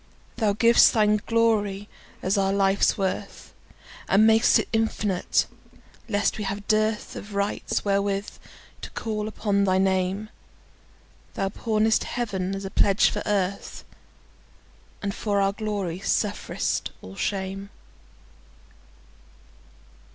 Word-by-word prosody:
Thou 215 -3 +2
giv'st 230 +3 +5
Thine 210 -1 +3
agony 210 -3 +1 0.4
as 190 +3 +1
our 195 -1 +1
life's 195 0 +2
worth, 190 -1 -4 0.6
And 210 +3 +5
mak'st 220 +1 +5
it - - -1
infinite, 215 -4 +1 0.6
lest 205 0 0
we - - -2
have 200 +1 -4
dearthOf 215 -1 -1
rights 200 +1 -1
wherewith 200 0 -1 0.4
to - - -7
call 215 -2 -3
upon 205 -2 0
thy 185 -1 +2
Name; 190 +2 0 1.1
Thou 195 - -1
pawnest 220 +1 +1
Heaven 195 -6 -3
as 195 0 -6
a 195 - -5
pledge 200 0 +3
for - - -3
Earth, 200 -1 -2 1.2
And 200 0 -2
for 205 -1 -1
our 195 0 +2
glory 200 -5 -3
sufferest 205 +1 -1
all 95 +1 -10
shame. 195 - -3
200 Hz, 115 wpm, -25 LUFS, 195-215 Hz, 1.2 s, giv'st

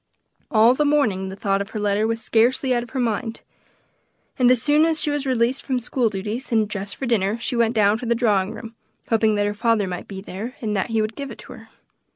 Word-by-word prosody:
All 225 +2 +5
the 300 - +1
morning 240 -11 +1
the 190 - -7
thought 195 0 0
of 200 - -5
her 215 - -5
letter 205 +1 +1
was 225 0 -1
scarcely 245 +4 +2
out 240 - +1
of 240 - -9
her 260 - -4
mind, 230 -1 -2 1.0
and 245 -1 +5
as 250 -1 +4
soon 295 +5 +3
as 325 -1 +2
she 295 - 0
was 290 -1 -2
released 255 +1 +1
from 260 -2 -1
school 245 0 0
duties, 215 +6 -5
and 220 -2 +2
dressed 205 -1 -5
for 270 - -5
dinner, 215 -3 +1
she 235 - -3
went 235 0 +2
down 210 0 +3
to 245 - -5
the 235 - +2
drawing 210 -5 +1
room, 225 0 -9 0.4
hoping 220 -1 +3
that 205 0 +1
her 205 - -1
father 220 -1 +1
might 180 -1 -6
be 195 -2 -7
there, 205 +6 -7
and 215 -3 -2
that 195 +4 -1
he 225 -1 +1
would 215 +1 -4
give 280 -1 -6
it 235 - -9
to 255 - -11
her. 225 -2 -14
225 Hz, 245 wpm, -22 LUFS, 205-250 Hz, 1.0 s, All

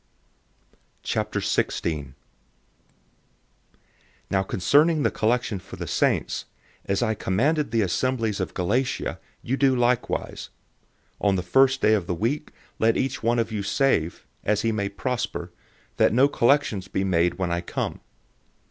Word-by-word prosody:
016:001 75 -5 -1 2.2
Now 95 - +3
concerning 145 - +3
the - - +2
collection 115 -2 0
for - - -11
the - - -5
saints, - - 0 0.4
as 100 +3 0
I 110 -2 +1
commanded 140 +11 0
the 110 -1 +2
assemblies 110 +3 0
of - - -3
Galatia, 115 +9 -1 0.2
you 130 +3 -1
do 135 -2 +3
likewise. 120 0 -1 0.7
016:002 - - +2
On 100 - +3
the 90 - -1
first 135 +8 +3
day 110 - +4
of 100 -5 0
the 90 - -1
week, 120 - -1 0.3
let 115 0 +3
each 135 +1 -1
one 115 +1 +2
of 115 -1 0
you 105 -2 -2
save, 100 - 0 0.2
as 105 0 +1
he 115 - +2
may 100 -2 -1
prosper, 125 +4 -3 0.5
that - - +4
no 130 +4 +5
collections 120 -8 +2
be 95 - -1
made 90 -2 +2
when 90 -2 -2
I 85 0 0
come. 85 - -4
110 Hz, 140 wpm, -25 LUFS, 95-130 Hz, 2.2 s, no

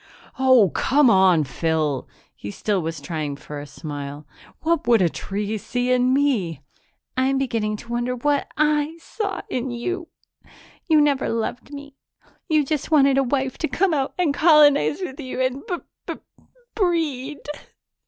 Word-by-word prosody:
"Oh, 255 -8 +5
come 275 -2 +3
on, 185 -4 +5
Phyl!" 155 -1 -1 0.3
He 100 - -8
still 195 - -1
was 160 -1 -4
trying 150 -1 -4
for 145 +1 -8
a 145 - -8
smile. 145 0 -7 0.4
"What 330 0 0
would 235 -2 +5
a 180 -3 +3
tree 205 +5 -4
see 245 +4 -2
in 250 0 +3
me?" 230 - +1 0.5
"I'm 265 +1 +1
beginning 225 -5 -1
to 235 - -13
wonder 240 +1 -1
what 285 +3 0
I 300 +1 +1
saw 400 +2 -4
in 255 +1 -3
you. 335 +9 -4 0.8
You 315 -3 +5
never 285 -3 +1
loved 230 +4 -3
me; 285 -1 -10 0.5
you 305 -2 +3
just 300 0 -2
wanted 275 -3 +4
a - - +3
wife 265 0 -1
to 315 - 0
come 340 +7 +1
out 275 -2 -1
and 345 -6 +1
colonize 300 0 +5
with 270 -7 -6
you 260 -3 -5
and 260 +1 0
b 365 - -1 0.3
b - - -3 0.6
breed." 305 - -1
260 Hz, 155 wpm, -23 LUFS, 200-295 Hz, 0.8 s, Oh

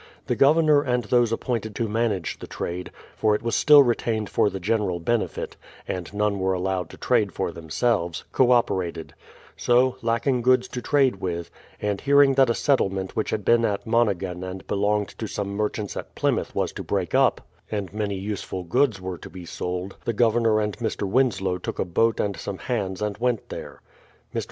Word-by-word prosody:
The - - 0
Gov 140 +3 +5
ernor 155 -3 +4
and 125 -1 +1
those 120 +1 +2
appointed 115 -2 -2
to 115 - -1
manage 105 -5 -1
the - - -8
trade 90 +1 -5 0.3
(for 110 -1 +2
it 105 - -4
was 115 - 0
still 150 -2 +7
retained 115 -3 -1
for - - +3
the 95 -1 -5
general 100 -2 0
benefit, 115 +7 -2 0.3
and 90 -2 -4
none 105 -1 0
were 95 0 +1
allowed 90 -1 -2
to - - -12
trade - - +1
for - - -2
themselves) 85 +1 -1
co 130 -2 +3
operated; 95 -9 +1 0.4
so, 125 +1 +3
lacking 120 +2 +1
goods 125 +1 +3
to 125 - -5
trade 135 -7 +2
with, 85 -2 -4 0.3
and 105 -1 -2
hearing 140 -1 +5
that 135 -2 +4
a 115 - +2
settlement 95 -9 0
which 110 - -1
had 105 -3 -2
been 115 0 +4
at 100 -3 -1
Monhegan 100 -6 0
and 95 0 -7
belonged 105 0 0
to 110 - -3
some 100 0 -3
merchants 105 0 -2
at - - -7
Plymouth - - 0
was - - 0
to - - -7
break - - -2
up, - - +3 0.3
and 100 -3 -4
many 105 -2 -2
useful 95 -2 -4
goods 115 +4 +1
were 90 -1 -5
to - - -10
be 90 -2 -10
sold, 90 +3 -4
the 115 - -1
Governor 115 -1 +3
and 105 -1 -1
Mr. 110 -3 -2
Winslow 95 -5 +1
took - - -5
a - - 0
boat 115 +6 +1
and 100 -1 0
some 100 -2 -5
hands 95 -1 -3
and 105 -1 -3
went 120 -3 -1
there. - - -8 0.5
Mr. - - 0
105 Hz, 195 wpm, -24 LUFS, 95-120 Hz, 0.5 s, still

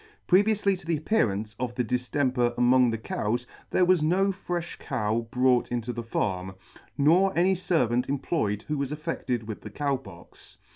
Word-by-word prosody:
Previoufly 200 0 +3
to - - -14
the 165 -2 +1
appearance 110 - 0
of 120 -1 -3
the 125 - 0
diftemper 125 0 0
among 125 0 +4
the 115 - -1
cows 110 +2 -2 0.2
there 180 - +3
was 180 -2 +4
no 185 +6 +2
frefh 175 -2 -5
cow 115 -2 -2
brought 125 0 +2
into 120 0 -2
the 120 - -4
farm, 95 -5 -2 0.4
nor 175 +7 +4
any 185 +2 +4
fervant 130 -10 0
employed 130 -7 -1
who 150 -1 -3
was 140 0 -2
attested 145 -7 -3
with 110 - -6
the 105 - -8
Cow 140 +5 -1
Pox. 95 -9 -15
130 Hz, 165 wpm, -27 LUFS, 115-170 Hz, 0.4 s, among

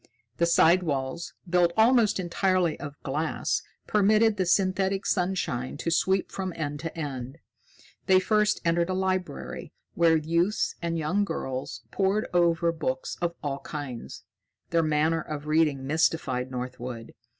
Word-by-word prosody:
The 170 - +2
side 170 +1 +5
walls, 145 0 -3
built 175 -1 +3
almost 225 -2 +4
entirely 185 -1 +1
of 145 0 -8
glass, 150 +4 -1 0.2
permitted 215 +1 +3
the 185 -3 -1
synthetic 190 +1 +1
sunshine 175 -9 -1
to 165 - -2
sweep 190 +3 +1
from 190 -2 -4
end 145 -2 -3
to 165 +1 -6
end. 135 -3 -5 0.7
They 190 -1 +6
first 210 +2 +2
entered 170 +1 +2
a 185 - 0
library, 185 -2 -3 0.2
where 165 -1 +4
youths 170 +6 0
and 170 -1 -1
young 165 +6 +1
girls 130 -10 -4
poured 200 +2 +1
over 170 -1 +3
books 260 +11 -3
of 170 -1 -1
all 140 -1 -2
kinds. 140 -6 -7 0.5
Their 165 0 +3
manner 155 +1 +1
of 150 -1 -6
reading 150 -3 +2
mystified 135 -4 0
Northwood. 125 -2 -6
170 Hz, 140 wpm, -27 LUFS, 145-185 Hz, 0.7 s, They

